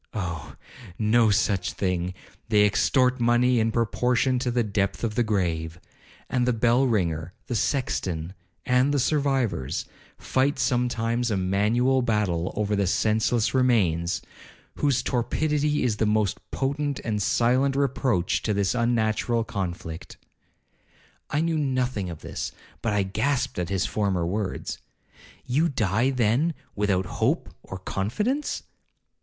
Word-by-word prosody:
Oh! 85 -6 -4 0.4
no 110 +1 +3
such 100 -3 +1
thing—they 95 +3 -1
extort 125 +5 +2
money 120 +1 +3
in 115 0 +1
proportion 125 +3 +1
to 125 - -1
the 120 0 +1
depth 100 -1 -1
of 115 -2 0
the 120 - +1
grave. 85 -7 -1 0.5
And 125 -1 0
the 125 - +3
bell 120 +3 +3
ringer, 85 -6 -1
the - - -4
sexton, 95 - -1 0.3
and 125 +3 +3
the 145 - +1
survivors, 135 - 0 0.3
fight 135 +2 0
sometimes 120 -2 0
a 105 - 0
manual 110 +8 +2
battle 105 -7 0
over 105 0 0
the 100 -2 +1
senseless 110 +3 +1
remains, 95 -10 +2 0.5
whose 140 -4 +1
torpidity 150 +4 0
is 115 -4 0
the 110 - +1
most 105 -2 +1
potent 140 +1 -2
and 105 -2 -1
silent 130 +6 +2
reproach 130 -9 +1
to 105 - -1
this 100 -2 +1
unnatural 115 -1 +1
conflict.' 85 -6 -5 1.1
I 150 - 0
knew 165 -1 0
nothing 130 -8 -1
of 80 -3 -8
this, - - -5 0.3
but 110 - 0
I 105 -1 +2
grasped 110 +5 -1
at 90 -1 -2
his 95 -1 0
former 95 -2 0
words, 100 +3 -3 0.7
'You 150 +7 +2
die, 110 0 +1
then, 130 +6 +1 0.2
without 100 -3 +1
hope - - -1
or 95 - -8
confidence?' 210 - -2
115 Hz, 130 wpm, -25 LUFS, 100-125 Hz, 1.1 s, no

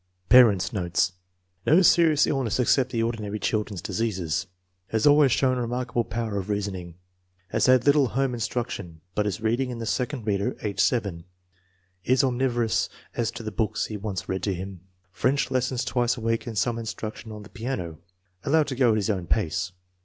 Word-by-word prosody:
Parents 105 -7 +6
9 100 - -1
notes. 90 +1 +1 0.5
No 175 +5 +5
serious 165 -4 +5
illness 130 -5 -1
except 125 +1 +3
the 115 -3 -1
ordi 115 0 -2
nary 105 0 -4
children's 105 -3 -2
diseases. 95 -5 -2 0.4
Has 110 -1 0
always 145 -2 +6
shown 130 +1 +2
remark 125 +1 -3
able 120 -1 0
power 110 -3 -3
of 95 +2 -6
reasoning. 95 -4 -3 0.5
Has - - +1
had 130 -1 +5
little 145 -1 +5
home 130 +2 0
instruc 120 +1 -2
tion, 85 -4 -7
but 105 0 0
is 100 0 -3
reading 120 +4 0
in 125 - -5
the 115 - -5
second 125 +1 -2
reader 100 -2 0
(age 105 -2 -3
7). 100 -10 +1 0.8
Is 130 +1 +3
omnivorous 120 -3 +1 0.2
as 115 -2 -1
to 115 0 -7
the 110 - -4
books 105 +1 -1
he 110 - -6
wants 95 -3 -4
read 95 -1 -2
to 95 0 -1
him. 95 0 -7 0.3
French 130 +7 0
lessons 130 -1 0
twice 120 -1 +1
a - - -7
week 115 +1 -1
and 115 -2 -5
some 115 +4 0
instruction 110 0 -6
on 105 -1 -8
the 105 - -13
piano. 100 -10 -5 0.4
Allowed 150 +1 +2
to 130 - -3
go 120 -4 +3
his 105 -1 0
own 90 -4 -3
pace. 85 +5 0
115 Hz, 190 wpm, -25 LUFS, 100-125 Hz, 0.8 s, Parents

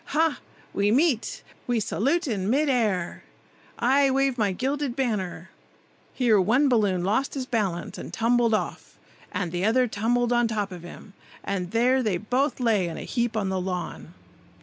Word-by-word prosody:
Ha! 320 +1 +1 0.3
we 200 +1 +2
meet! 265 0 +1 0.2
we 240 -2 +1
salute 280 - 0
in 200 -5 -1
mid 285 +5 +2
air. 210 -9 0 0.5
I 270 +3 +3
wave 270 0 +2
my 210 -5 +1
gilded 270 +5 -2
banner—" 190 -9 -2 0.6
Here 225 -6 +3
one 250 +10 +3
balloon 205 -8 +2
lost 220 +11 0
his 265 -2 -3
balance 200 -9 -2
and - - -7
tumbled 230 +3 +2
off, - - -5 0.3
and 180 -5 -2
the 175 +1 -2
other 245 +4 +3
tumbled 240 +3 0
on 240 -1 +3
top 210 -3 -2
of 180 -2 -8
him, 175 +3 -12 0.3
and 185 -3 -3
there 250 +5 +3
they 210 -7 0
both 250 +10 -1
lay 220 -7 +2
in 165 - -5
a - - -6
heap 235 -2 -1
on 200 -3 0
the 190 -1 -1
lawn. 180 -2 -5
225 Hz, 170 wpm, -25 LUFS, 195-255 Hz, 0.6 s, I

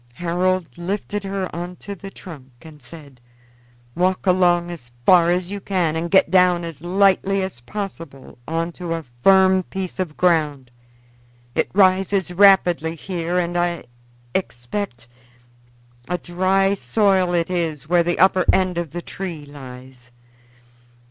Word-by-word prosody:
Harold 180 +1 -1
lifted 200 +3 -3
her 195 -1 -3
on 175 +1 -5
to 200 - -8
the 195 0 -9
trunk 150 -9 -12
and 155 -2 -14
said: 140 -2 -12 0.7
"Walk 185 +2 0
along 175 -2 +3
as 145 -9 -10 0.2
far 175 -2 +6
as 180 +1 -1
you 205 - -4
can 180 -5 0
and 165 +1 -2
get 190 - +4
down 180 -2 +4
as 165 -4 -8
lightly 195 +2 +2
as 190 -10 -6
possible 165 -5 -8
on 165 +1 -2
to 170 -1 -4
a 165 -2 -6 0.2
firm 190 +1 +5
piece 190 0 -6
of 170 -5 -3
ground. 150 -8 +1 0.8
It - - 0
rises 190 -1 +2
rapidly 175 -4 +4
here 175 +1 -3
and 175 -1 -1
is, - - +2
I 175 -1 -2 0.5
expect, 120 - -4 1.0
a 180 - 0
dry 190 +3 +1
soil 195 -2 +2
where 170 -1 0
the 175 +1 -1
upper 185 0 +4
end 185 -2 +1
of 170 -2 -4
the 175 +4 -6
tree 170 -6 -6
lies." 130 -3 -12
175 Hz, 140 wpm, -21 LUFS, 165-190 Hz, 1.0 s, far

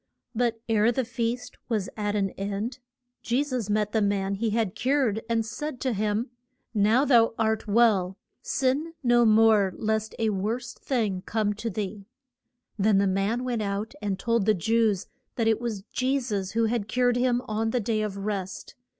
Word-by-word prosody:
But 230 -1 0
ere 225 0 +3
the 255 +1 -1
feast 235 +1 -3
was 215 -5 0
at 210 -1 -2
an 195 -2 0
end 205 +6 -4 0.4
Je 245 +4 +1
sus 255 -7 -3
met 210 0 +1
the 220 - +1
man 200 -1 0
He 220 +3 -1
had 215 -3 0
cured 255 -5 +1
and 225 -1 +1
said 255 +4 -5
to 260 -2 0
him, 215 +3 -1 0.4
Now 220 +6 +3
thou 230 -5 +4
art 220 0 0
well, 205 -4 +3 0.2
sin 280 +5 -1
no 240 -1 +4
more 215 -3 +5
lest 220 0 -1
a 220 -1 +1
worse 215 +5 -2
thing 215 -8 -1
come 215 -2 0
to 220 +3 -4
thee. 200 -1 -5 0.7
Then 205 0 +4
the 200 - +3
man 195 +6 0
went 245 -3 -1
out 200 +1 -3
and 200 -2 -1
told 230 0 0
the 215 - +5
Jews 215 0 +1 0.3
that 230 -2 0
it 225 0 +2
was 220 -5 -3
Je 265 +2 +1
sus 205 -7 -3
who 230 0 +2
had 220 -2 -1
cured 245 +1 +2
him 245 0 +1
on 220 +1 -1
the 245 - 0
Day 220 0 0
of 210 -2 -3
Rest. 195 -2 -4
220 Hz, 180 wpm, -26 LUFS, 205-240 Hz, 0.7 s, more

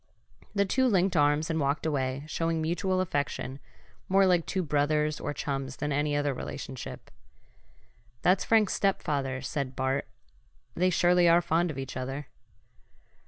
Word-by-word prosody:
The 200 0 +3
two 260 +7 +2
linked 190 -4 +2
arms 145 +1 +2
and 160 - 0
walked 140 +2 0
away, 135 -3 -1
showing 165 +1 -1
mutual 185 +4 0
affection 145 -5 -2 0.5
more 195 +1 +5
like 180 -3 +2
two 190 - -1
brothers 150 0 +1
or 145 - -3
chums 135 -2 -3
than 150 - -3
any 145 +1 0
other 145 -1 +1
relationship. 130 0 -7 1.1
"That's 185 +1 +4
Frank's 220 -3 +3
stepfather," 140 -9 -1
said 135 -2 -3
Bart. 130 +1 -1 0.7
"They 180 +2 +2
surely 175 0 +4
are 170 +1 +6
fond 175 0 +1
of 150 - -5
each 135 -1 -5
other." 135 +2 -5
150 Hz, 145 wpm, -28 LUFS, 140-175 Hz, 1.1 s, are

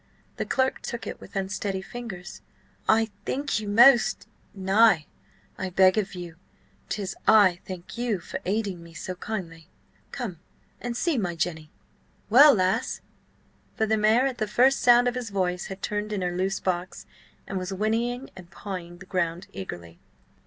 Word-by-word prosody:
The - - -3
clerk 265 -1 0
took 235 -2 -5
it - - -7
with - - -13
unsteady 195 0 -2
fingers. 195 -4 -8 0.5
"I 225 0 +4
thank 280 -3 -1
you 215 - -6
most—" 240 +3 +6 0.3
"Nay, 195 -3 +4 0.5
I 190 - -2
beg 185 +1 +5
of 195 -2 -4
you. 175 -2 -8 0.5
'Tis 195 -3 -3
I 200 -5 +6
thank 185 +4 -8
you 240 -4 0
for 175 - -6
aiding 200 -2 -2
me 170 0 -14
so 185 +4 -5
kindly.... 175 -4 -6 0.4
Come 210 - -5 0.4
and 240 -1 -3
see 315 -4 +1
my 175 -4 -2
Jenny! 160 -2 -3 0.6
Well, 280 +4 +9
lass?" 185 -1 0 0.7
For 220 - +1
the 220 0 +2
mare 220 +4 +4
at 260 -3 -2
the 215 - 0
first 255 +6 +4
sound 245 0 +6
of 245 - +1
his 245 -2 -4
voice 180 -2 -1
had 190 0 -9
turned 210 0 -2
in 200 -3 -2
her 175 0 -2
loose 190 +2 -1
box, 180 0 -3 0.4
and 190 - -3
was 185 +1 -5
whinnying 230 +6 -1
and 180 -2 -12
pawing 180 -3 -7
the 190 - -12
ground 175 -1 -2
eagerly. 85 -3 -8
195 Hz, 165 wpm, -26 LUFS, 180-225 Hz, 0.7 s, Well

